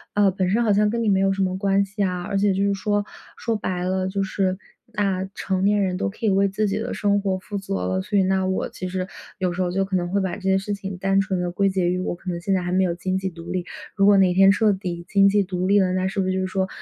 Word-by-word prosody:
呃， 205 -1 +4
本 185 -1 -1
身 220 +5 +2
好 215 -3 +3
像 210 +1 +3
跟 230 +2 -1
你 225 - 0
没 195 -1 +3
有 195 0 +3
什 195 0 -1
么 185 -1 0
关 195 0 +2
系 200 +1 -3
啊。 180 -2 -1
而 200 +2 -2
且 200 0 +2
就 195 +1 0
是 200 0 +2
说， 205 +1 -1 0.3
说 230 0 -1
白 185 -4 -3
了 185 0 -1
就 195 +1 -1
是 190 -1 -1 0.4
那 190 -2 0
成 190 -1 -1
年 205 +1 +3
人 185 -1 -1
都 200 - -1
可 215 +3 -6
以 - - +4
为 195 0 +3
自 210 +2 -1
己 200 +1 -1
的 230 +2 -3
生 205 -1 +1
活 195 -1 0
负 200 +2 -6
责 195 - -4
了， 95 0 -1
所 200 - -1
以 195 - +4
那 190 0 +1
我 190 - -1
其 185 - -6
实 185 0 -3 0.3
有 180 -2 0
时 185 - -3
候 180 -1 0
就 195 +1 0
可 190 0 -3
能 175 -1 -1
会 200 - +2
把 190 -2 -2
这 205 - -11
些 190 0 +2
事 195 +2 -3
情 195 -1 -6
单 195 +1 +2
纯 195 -2 -2
地 175 0 -2
归 195 +2 +1
结 190 -2 0
于 180 +1 -1
我 185 - -2
可 180 - -8
能 170 - -4
现 195 +2 0
在 185 - 0
还 175 - -3
没 185 +1 +3
有 175 -2 +1
经 185 +2 -2
济 190 0 -2
独 170 0 -9
立， 180 -1 -2 0.3
如 195 - +3
果 205 -1 +6
哪 185 -2 +4
天 195 +1 +6
彻 210 +1 +3
底 175 -3 -5
经 195 0 +4
济 205 0 +3
独 185 -1 -2
立 200 +1 +4
了， 185 -2 +2
那 185 0 0
是 195 +1 -3
不 190 - +1
是 185 - 0
就 190 - -1
是 185 - -1
说， 190 0 -1
190 Hz, 335 characters per minute, -23 LUFS, 185-200 Hz, 0.4 s, 果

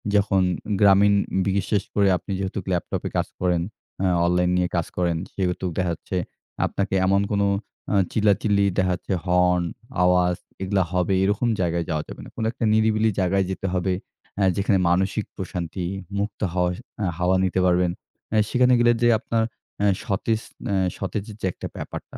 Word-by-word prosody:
যখন 100 -1 +3 0.4
গ্রামীণ 100 0 +6 0.5
বিশেষ 100 +1 0
করে 100 -1 +3
আপনি 100 - -9
যেহেতু 95 +1 -2
ল্যাপটপে 90 -2 -2
কাজ - - 0
করেন। 90 -2 +1 0.4
অ্যা 95 -1 +2
অনলাইন 90 0 +2
নিয়ে 90 0 +1
কাজ 85 -1 0
করেন। 85 -2 +1 0.2
সেহেতু 95 -1 -1
দেখাযাচ্ছে 90 0 -2 0.5
আপনাকে 100 -1 -1
এমন 100 +1 +3
কোনো 100 -1 +2 0.5
আ - - +3 0.2
চিল্লাচিল্লি 100 -1 +2
দেখা 95 -1 +2
যাচ্ছে 90 - -4
হর্ন, 90 0 +3 0.4
আওয়াজ 90 0 +3 0.3
এগুলা 95 0 +1
হবে 90 +1 +1
এরকম 105 +5 +1
জায়গায় 85 -1 0
যাওয়া 75 -2 -1
যাবে - - -9
না। - - -10
কোনো 115 - -2
একটা 120 - -6
নিরিবিলি 110 0 +3
জায়গায় 95 +1 +2
যেতে 95 +1 -3
হবে। 95 0 +1 0.4
অ্যা 100 - +2
যেখানে 100 0 +2
মানসিক 95 +4 +1
প্রশান্তি 90 -1 -4 0.3
মুক্ত 100 +1 -3
হাওয়ার 90 -1 +1 0.3
অ্যা 100 -4 0
হাওয়া 90 +1 +2
নিতে 95 0 +1
পারবেন। 90 -1 +3 0.4
অ্যা 110 - +3
সেখানে 125 0 +4
গেলে 120 0 +5
যে, 120 - +5
আপনার 115 -1 0 0.4
অ্যা 105 - +2 0.2
সতেজ 110 +3 -1 0.2
ন্যা 100 - 0 0.2
সতেজের 100 +2 -4
যে, - - -1
একটা - - -6
ব্যাপারটা - - -7
95 Hz, 160 wpm, -24 LUFS, 90-100 Hz, 0.5 s, গ্রামীণ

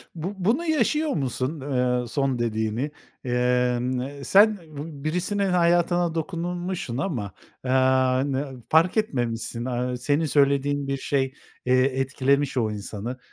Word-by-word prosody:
Bu 180 +6 -4
bunu 235 - +1
yaşıyor 305 +1 +1
musun, 135 +1 -2
eee, 125 -3 0
son 135 -1 0
dediğini? 115 +4 -1 0.3
Emm, 125 0 +1
eee, 140 +1 -7
sen 205 +5 +5
bi 155 -3 -9
birisinin 180 +5 0
hayatına 175 -1 +2
dokunmuşsun 175 -4 -3
ama, 125 - -2 0.3
eee, 130 - 0 0.6
n 130 -2 -4
fark 165 +6 +4
etmemişsin, 120 - -1
aaa, 125 0 -2
senin 145 +6 +1
söylediğin 140 -1 +2
bir 140 - -1
şey, 135 -1 -1 0.3
eee, 130 0 +4
etkilemiş 135 +1 +1
o 110 -3 +1
insanı. 105 +4 -5
140 Hz, 125 wpm, -25 LUFS, 125-170 Hz, 0.6 s, sen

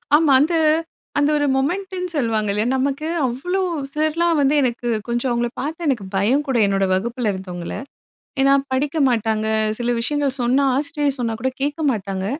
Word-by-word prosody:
ஆமா. 305 -1 +4
அந்த 315 +4 +1 0.7
அந்த 290 0 +3
ஒரு 290 - +1
மொமெண்ட்ன்னு 360 +6 -2
சொல்லுவாங்க 225 -6 0
இல்லையா? 210 +3 0
நமக்கு 280 +3 -1 0.2
அவ்வளோ 310 +10 -1 0.3
சிலர்லாம் 315 +2 +1
வந்து 280 +1 +3
எனக்கு 245 -2 -1 0.2
கொஞ்சம் 240 +2 -1
அவங்கள 240 0 0
பார்த்து 320 +5 -4
எனக்கு 245 -8 0
பயம் 235 +10 +2
கூட, 265 -3 +1
என்னோட 195 -1 +1
வகுப்பில 230 +3 -1
இருந்தவங்கள. 180 -2 -6 0.7
ஏனா 275 0 +5 0.2
படிக்க 285 +4 -1
மாட்டாங்க, 220 -3 0 0.3
சில 240 0 -2
விஷயங்கள் 280 +2 0
சொன்னா, 255 +4 +2
ஆசிரியர் 285 0 0
சொன்னா 230 -2 -1
கூட 260 +3 0
கேட்க 290 +3 -1
மாட்டாங்க. 195 -4 -3
265 Hz, 155 wpm, -21 LUFS, 230-295 Hz, 0.7 s, ஏனா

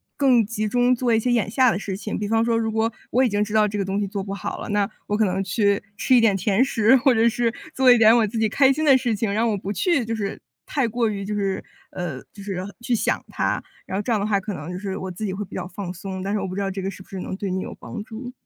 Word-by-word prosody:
更 255 -5 +4
集 215 0 -2
中 245 +3 +3
做 240 -1 +1
一 220 - +4
些 245 +2 0
眼 230 -5 +1
下 255 +1 +4
的 - - -1
事 195 -1 -4
情。 210 +2 -4
比 205 - -3
方 225 +1 +2
说， 230 0 +1
如 225 -1 0
果 220 +1 +1 0.2
我 255 +3 +3
已 250 - +3
经 205 0 +1
知 210 0 -6
道 215 -1 +4
这 210 0 -4
个 200 - -1
东 195 +1 -1
西 205 - -1
做 195 0 -4
不 195 0 -5
好 200 - -4
了， - - -6
那 205 0 +1 0.2
我 205 - 0
可 220 - +3
能 190 0 0
去 200 +1 +1
吃 260 - +3
一 240 - +6
点 220 -3 +4
甜 195 +4 +2
食， 230 -1 +4
或 260 0 +4
者 230 0 +4
是 235 0 0 0.2
做 260 -1 +6
一 245 - +7
点 225 0 +7
我 230 - +4
自 220 +2 -3
己 220 -1 +2
开 270 +4 +4
心 310 - -2
的 275 -4 +6
事 245 -3 0
情， 210 0 -1
让 220 +3 +1
我 205 - -1
不 195 +1 -4
去 280 - +1
就 225 0 -2
是 200 -2 -4 0.3
太 270 -5 0
过 230 0 0
于， 200 -2 -4
就 210 +1 -3
是， 195 -2 -1 0.3
呃， 170 -8 -4
就 200 - -11
是 195 -1 -4 0.3
去 240 +1 -1
想 - - 0
它。 - - -1 0.2
然 190 - -3
后 - - 0
这 220 - -3
样 220 - +2
的 200 - -1
话 205 -2 +2
可 205 +2 -5
能 155 -2 -7
就 180 - -4
是 195 -1 -4
我 190 - -5
自 200 +5 -5
己 190 - -2
会 200 +2 -3
比 - - -11
较 180 -1 -4
放 185 -1 -6
松， 190 +1 -6
但 200 +1 -2
是 210 - +1
我 195 - -3
不 185 - -6
知 200 - -2
道 195 -1 -1
这 195 0 -4
个 190 - -2
是 190 -1 -10
不 - - -27
是 190 - -6
能 185 - -4
对 195 -1 -3
你 185 - -1
有 - - -7
帮 215 -3 -7
助。 245 +2 -8
210 Hz, 340 characters per minute, -23 LUFS, 195-230 Hz, 0.3 s, 一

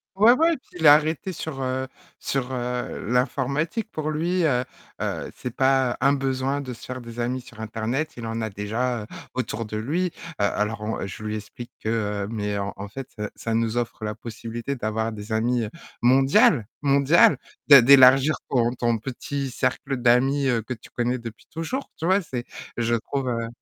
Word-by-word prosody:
Ouais, 215 +5 +7
ouais, 325 +5 +3
puis 255 -9 -15
il 160 - +5
a 145 - +11
arrêté 160 +5 -1
sur, 155 -4 -5
heu, 130 0 -2 0.3
sur, 130 -2 -2
heu, 125 -1 -3
l'informatique 140 - 0
pour 155 0 -3
lui, 170 +4 0
heu, 125 -4 +2 0.4
heu, - - -3
c'est 125 -2 -6
pas 130 -2 +3
un 140 - +5
besoin 135 0 -1
de 130 -3 -5
se - - -14
faire 130 0 -6
des 115 0 -9
amis 125 +2 -1
sur 115 -2 -15
internet, 115 +8 -2
il 115 - -6
en 115 0 -3
a 110 - -2
déjà, 110 +4 -2
heu, - - -8 0.3
autour 115 -2 -2
de 105 0 -5
lui, 155 +12 0
heu, - - -4 0.3
alors 105 +2 0
on 105 -2 -3
je 100 - -8
lui 110 0 -3
explique 110 +3 -8
que, 110 - -1 0.3
heu, - - -4
mais 105 -2 -2
en 100 0 -3
en 100 +1 -6
fait 135 +5 -8 0.3
ça 115 - -3
nous 115 +1 0
offre 115 -2 -3
la 105 - -3
possibilité 115 +4 -5
d'avoir 110 0 -2
des 105 +1 -8
amis, 115 +1 +1
heu, 105 - -6 0.3
mondial, 130 -1 +5 0.2
mondial, 140 +2 +5 0.3
de 140 -2 +11
d'élargir 135 +3 +7 0.2
ton 120 -2 +2
ton 120 -2 0
petit 135 +3 -4
cercle 130 +2 -1
d'amis, 130 +3 +3
heu, 115 -4 +1
que 125 - -4
tu 115 - -14
connais 125 +1 -1
depuis 115 -1 -9
toujours, 240 +13 -4
tu 165 - -3
vois, 190 +2 +4
c'est 125 -6 -5 0.3
je 120 0 +1
trouve, 130 +3 -3
heu, 115 -1 -2
125 Hz, 195 wpm, -24 LUFS, 115-140 Hz, 0.4 s, a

